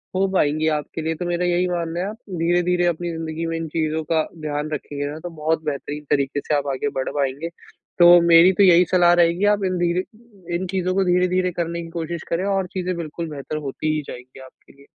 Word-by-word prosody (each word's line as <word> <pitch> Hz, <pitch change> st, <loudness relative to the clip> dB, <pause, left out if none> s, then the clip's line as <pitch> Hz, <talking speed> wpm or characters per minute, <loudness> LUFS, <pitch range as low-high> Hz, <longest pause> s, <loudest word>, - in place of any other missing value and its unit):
हो 195 Hz, +1 st, +2 dB
पाएँगी 155 Hz, -2 st, +1 dB
आपके 150 Hz, +2 st, -7 dB
लिए। 160 Hz, +1 st, -2 dB
तो 175 Hz, -, -5 dB
मेरा 175 Hz, 0 st, -1 dB
यही 175 Hz, +1 st, +1 dB
मानना 170 Hz, -1 st, -2 dB
है 190 Hz, -, -1 dB
आप 220 Hz, -, -8 dB, 0.2 s
धीरे-धीरे 175 Hz, +1 st, +2 dB
अपनी 175 Hz, +1 st, -1 dB
ज़िंदगी 160 Hz, 0 st, -4 dB
में 165 Hz, -, -2 dB
इन 165 Hz, -, -4 dB
चीज़ों 160 Hz, 0 st, -1 dB
का 160 Hz, -1 st, +3 dB, 0.2 s
ध्यान 150 Hz, 0 st, -3 dB
रखेंगे 145 Hz, -1 st, -4 dB
ना, 155 Hz, -, -7 dB
तो 175 Hz, -, -7 dB
बहुत 160 Hz, +1 st, -1 dB
बेहतरीन 150 Hz, 0 st, -4 dB
तरीके 140 Hz, 0 st, +1 dB
से 150 Hz, -, +2 dB
आप 145 Hz, -1 st, -1 dB
आगे 215 Hz, +11 st, -2 dB
बढ़ 130 Hz, -, -2 dB
पाएँगे, 140 Hz, +3 st, -2 dB, 0.5 s
तो 175 Hz, 0 st, +9 dB
मेरी 170 Hz, +2 st, +7 dB
तो 200 Hz, -, +6 dB
यही 180 Hz, -1 st, +6 dB
सलाह 175 Hz, -1 st, +5 dB
रहेगी 170 Hz, +4 st, +1 dB
आप 200 Hz, -, -6 dB
इन 185 Hz, -1 st, -1 dB
धीरे 175 Hz, +1 st, +1 dB, 0.5 s
इन 180 Hz, +2 st, -2 dB
चीज़ों 185 Hz, -1 st, 0 dB
को 195 Hz, -, +3 dB
धीरे-धीरे 180 Hz, 0 st, +2 dB
करने 170 Hz, +1 st, -3 dB
की 165 Hz, -, -9 dB
कोशिश 165 Hz, 0 st, -4 dB
करें 170 Hz, +3 st, -1 dB
और 195 Hz, -2 st, 0 dB
चीज़े 185 Hz, -1 st, -2 dB
बिल्कुल 165 Hz, 0 st, -5 dB
बेहतर 145 Hz, 0 st, -5 dB
होती 155 Hz, +3 st, -2 dB
ही 150 Hz, -, -1 dB
जाएगी 125 Hz, +2 st, -10 dB
आपके 130 Hz, -, -18 dB
लिए। 140 Hz, 0 st, -20 dB
165 Hz, 220 wpm, -22 LUFS, 155-180 Hz, 0.5 s, तो